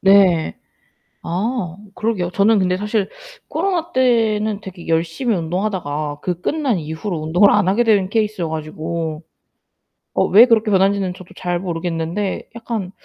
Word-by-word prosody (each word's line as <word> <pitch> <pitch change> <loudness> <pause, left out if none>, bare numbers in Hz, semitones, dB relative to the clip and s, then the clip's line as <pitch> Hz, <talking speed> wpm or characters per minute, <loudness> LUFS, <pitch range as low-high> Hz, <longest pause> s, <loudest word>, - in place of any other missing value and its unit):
네. 190 - +4 0.7
아 185 0 -2 0.2
그러게요. 195 -6 -1
저는 210 +3 +4
근데 185 -1 +1
사실 210 0 -1 0.4
코로나때는 250 - +1
되게 185 -3 -10
열심히 165 +8 0
운동하다가 160 -5 -2
그 180 -1 -3
끝난 285 - 0
이후로 160 +4 -4
운동을 175 +6 +4
안하게 200 +6 +3
된 200 -4 +3
케이스여 210 -6 0
가지고. 160 +1 -4 0.9
어 - - +3
왜 215 +6 +8
그렇게 225 -3 +3
변하는지는 195 -1 +2
저도 185 0 -13
잘 175 -1 -2
모르겠는데 175 +2 -3
약간 225 -5 -4
190 Hz, 310 characters per minute, -19 LUFS, 170-215 Hz, 0.9 s, 왜